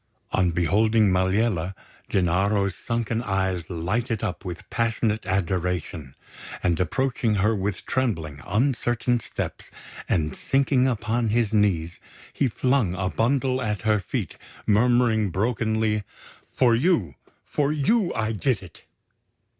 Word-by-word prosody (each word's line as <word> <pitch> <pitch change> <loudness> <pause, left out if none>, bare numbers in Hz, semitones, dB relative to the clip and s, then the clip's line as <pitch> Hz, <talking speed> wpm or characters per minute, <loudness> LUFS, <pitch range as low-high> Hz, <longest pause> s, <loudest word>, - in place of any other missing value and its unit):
On 90 -2 +2
beholding 105 +5 +3
Maliella, 95 0 +1 0.3
Gennaro's 100 +2 +1
sunken 115 +1 -2
eyes 95 -6 -1
lighted 110 +7 -2
up 105 -2 -3
with 90 -3 -7
passionate 110 -3 0
adoration; 90 -6 -2 0.5
and 85 -3 +1
approaching 115 +4 0
her 105 +3 +2
with 100 -1 -3
trembling, 80 - -2
uncertain 120 0 +1
steps, - - -5 0.4
and 80 -3 0
sinking 135 -1 +2
upon 115 -1 0
his 115 -1 +1
knees, 90 -6 +1 0.3
he 140 - +1
flung 125 -6 +1
a 95 -1 -1
bundle 130 +2 +1
at 105 -4 -2
her 110 -1 +3
feet, 95 - -4 0.3
murmuring 115 -1 +3
brokenly: 110 +2 0 0.5
"For 125 -3 +3
you! 115 - +2 0.3
For 145 -1 0
you 175 +6 +2
I 110 0 0
did 110 -1 0
it!" 85 -3 -15
105 Hz, 120 wpm, -24 LUFS, 95-120 Hz, 0.5 s, beholding